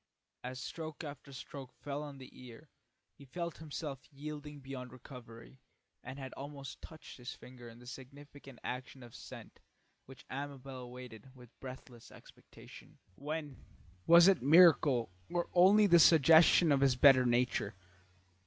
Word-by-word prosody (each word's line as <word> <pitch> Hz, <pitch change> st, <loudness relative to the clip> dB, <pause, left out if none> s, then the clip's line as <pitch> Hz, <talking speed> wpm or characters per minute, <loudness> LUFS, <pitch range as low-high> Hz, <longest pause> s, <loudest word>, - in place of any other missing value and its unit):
As 130 Hz, +1 st, -6 dB
stroke 160 Hz, +3 st, -7 dB
after 145 Hz, -2 st, -9 dB
stroke 135 Hz, 0 st, -10 dB
fell 145 Hz, 0 st, -6 dB
on 145 Hz, -2 st, -8 dB
the 130 Hz, -, -12 dB
ear, 125 Hz, +4 st, -14 dB, 0.4 s
he 140 Hz, -, -17 dB
felt 170 Hz, +5 st, -6 dB
himself 145 Hz, -3 st, -7 dB
yielding 150 Hz, 0 st, -8 dB
beyond 130 Hz, -2 st, -8 dB
recovery, 125 Hz, -1 st, -13 dB, 0.4 s
and 130 Hz, +2 st, -9 dB
had 135 Hz, -2 st, -8 dB
almost 140 Hz, -1 st, -9 dB
touched 160 Hz, -2 st, -12 dB
his 125 Hz, 0 st, -8 dB
finger 125 Hz, -2 st, -13 dB
in 115 Hz, -, -14 dB
the 120 Hz, -, -16 dB
significant 135 Hz, +1 st, -12 dB
action 125 Hz, +1 st, -7 dB
of 120 Hz, -, -13 dB
assent -, -, -12 dB, 0.5 s
which 135 Hz, 0 st, -14 dB
Amabel 135 Hz, -1 st, -7 dB
awaited 125 Hz, 0 st, -11 dB
with 125 Hz, -2 st, -16 dB
breathless 130 Hz, -2 st, -11 dB
expectation, -, -, -16 dB, 0.2 s
when 150 Hz, -, -7 dB, 0.4 s
was 170 Hz, +1 st, +8 dB
it 195 Hz, -7 st, +4 dB
miracle 145 Hz, -, +5 dB, 0.2 s
or 175 Hz, 0 st, -2 dB
only 195 Hz, +4 st, +6 dB
the 175 Hz, -3 st, +6 dB
suggestion 160 Hz, +1 st, +6 dB
of 140 Hz, -1 st, +2 dB
his 135 Hz, -2 st, +3 dB
better 130 Hz, 0 st, +6 dB
nature? 120 Hz, -4 st, 0 dB
135 Hz, 145 wpm, -33 LUFS, 125-150 Hz, 0.5 s, was